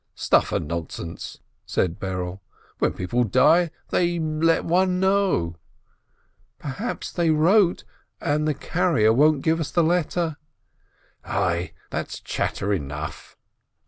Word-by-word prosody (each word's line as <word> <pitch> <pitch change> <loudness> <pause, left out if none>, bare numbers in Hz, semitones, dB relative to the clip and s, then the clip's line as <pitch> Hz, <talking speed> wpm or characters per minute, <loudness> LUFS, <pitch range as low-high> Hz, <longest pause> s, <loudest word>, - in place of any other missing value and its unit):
"Stuff - - +2
and 75 - -1
nonsense!" 85 +1 -6 0.3
said 85 -2 -1
Berele. 90 -1 -4 0.4
"When - - +1
people 120 +7 0
die, 155 - +4 0.2
they 175 -1 +1
let 160 +1 +1
one 180 +2 +2
know 190 - +1 0.3
— - - -43
" - - -40
"Perhaps 195 - -5
they 170 -2 +1
wrote, 175 +4 +4 0.4
and 150 +1 0
the 150 - +1
carrier 165 -13 +2
won't 150 +2 +4
give 160 0 +2
us 155 - -2
the 170 - +2
letter—" 170 -1 0 0.9
"Ai, 85 0 -1 0.2
that's - - -4
chatter 100 +1 -2
enough 75 -2 -5
155 Hz, 125 wpm, -24 LUFS, -, 0.9 s, die